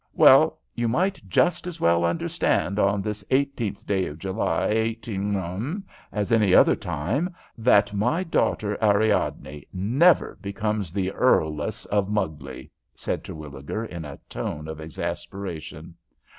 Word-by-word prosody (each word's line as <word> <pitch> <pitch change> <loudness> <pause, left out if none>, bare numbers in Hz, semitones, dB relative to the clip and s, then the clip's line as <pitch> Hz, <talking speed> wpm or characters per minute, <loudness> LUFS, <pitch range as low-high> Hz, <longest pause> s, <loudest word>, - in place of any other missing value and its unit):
"Well, - - +7 0.2
you 120 0 -1
might 185 +12 0
just 175 - +2
as 180 - -6
well 85 0 +3
understand 85 +3 0
on 100 0 +2
this 105 -1 -4
18th 130 -5 -1
day 95 -2 0
of 75 - -7
July, 90 -1 -1
18, 110 - -2 0.3
as 105 -1 -2
any 105 -5 +4
other - - +6
time, 145 - -2 0.2
that 105 -3 +3
my 120 - +1
daughter 105 - 0
Ariadne 100 -9 +1
never 125 - +3
becomes 100 -2 -2
the 95 0 -1
Earless 75 -5 +1
of 100 -1 0
Mugley," 75 -11 -3 0.2
said - - -3
Terwilliger, 75 +7 -6
in 85 -6 -7
a 70 -2 -8
tone 75 +1 -5
of 80 0 -7
exasperation. 85 +2 -6
100 Hz, 130 wpm, -25 LUFS, 85-115 Hz, 0.3 s, Well